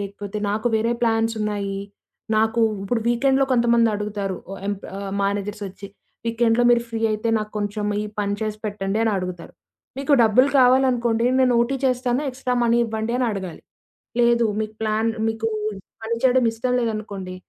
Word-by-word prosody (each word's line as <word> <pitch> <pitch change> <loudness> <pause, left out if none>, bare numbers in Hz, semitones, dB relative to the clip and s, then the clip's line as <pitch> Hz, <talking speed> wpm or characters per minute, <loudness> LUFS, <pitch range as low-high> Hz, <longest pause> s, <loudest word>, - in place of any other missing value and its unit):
లేకపోతే 200 +1 -5
నాకు 215 +3 -2
వేరే 225 +2 +1
ప్లాన్స్ 225 0 +2
ఉన్నాయి. 200 -2 -2 0.6
నాకూ 220 +2 +2 0.2
ఇప్పుడు 225 +4 -1
వీకెండ్‌లో 270 +3 +3
కొంతమంది 235 -1 +4
అడుగుతారు 205 -2 -3
ఓ 195 - -5
ఎంప్ 205 -1 -4
ఆహ్, 195 -1 -5
మేనేజర్స్ 205 +1 -2
ఒచ్చి. 195 +1 -11 0.4
వీకెండ్‌లో 230 +1 +2
మీరు 235 -1 +4
ఫ్రీ 225 -1 -4
అయితే 215 +2 -1
నాకు 215 0 -5
కొంచెం 205 0 -3 0.2
ఈ - - -4 0.2
పని 200 0 -1
చేసి 215 -1 -3
పెట్టండి 205 0 -2
అని 225 - +2
అడుగుతారు. 180 -2 -5 0.5
మీకు 280 +1 0
డబ్బులు 250 +5 +5
కావాలనుకోండి 245 -2 +3
నేను 250 -1 +4
ఓటీ 265 +3 +1
చేస్తాను 255 +1 +1
ఎక్స్‌స్ట్రా‌మనీ 245 -2 +1
ఇవ్వండి 220 +1 -3
అని 250 - +1
అడగాలి. 190 -4 -6 0.6
లేదు 235 0 +4 0.2
మీకు 215 0 -4
ప్లాన్ 220 +1 +1 0.2
మీకు 225 0 -1 0.5
పని 230 +1 -1
చేయడం 255 -1 +4
ఇష్టం 250 +2 -2
లేదనుకోండి 205 -5 -4
225 Hz, 155 wpm, -22 LUFS, 205-240 Hz, 0.6 s, డబ్బులు